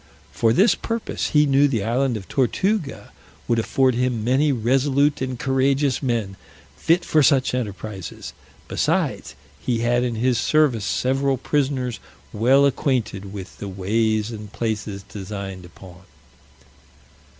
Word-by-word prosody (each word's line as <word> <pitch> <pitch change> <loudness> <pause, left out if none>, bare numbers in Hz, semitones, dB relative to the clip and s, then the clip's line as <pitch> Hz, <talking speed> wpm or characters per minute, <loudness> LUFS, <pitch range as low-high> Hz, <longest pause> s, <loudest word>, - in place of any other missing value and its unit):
For 115 - +2
this 195 - +4
purpose 230 -1 -3
he 150 0 +4
knew 140 0 +4
the 115 -7 -1
island 120 +2 0
of 95 -4 -10
Tortuga 160 - -1 0.4
would 115 -1 +2
afford 130 +3 +2
him 125 -2 -1
many 135 +5 +2
resolute 135 +4 +1
and 130 -1 -3
courageous 135 +1 +1
men, 115 -7 -2 0.4
fit 170 +2 +1
for 155 - +3
such 135 -1 +3
enterprises: 105 -6 -5 0.3
besides, - - -1 0.2
he 120 -2 -1
had 120 +1 +2
in 120 -2 -2
his 125 +2 +1
service 145 -9 +2
several 135 +3 0
prisoners 130 -3 -1 0.3
well 130 +6 +4
acquainted 120 -8 -1
with 100 -2 -9
the 100 - -5
ways 110 +3 0
and 105 -2 -8
places 105 -3 -3
designed 95 -2 -7
upon. 90 +1 -14
125 Hz, 130 wpm, -22 LUFS, 105-135 Hz, 0.4 s, this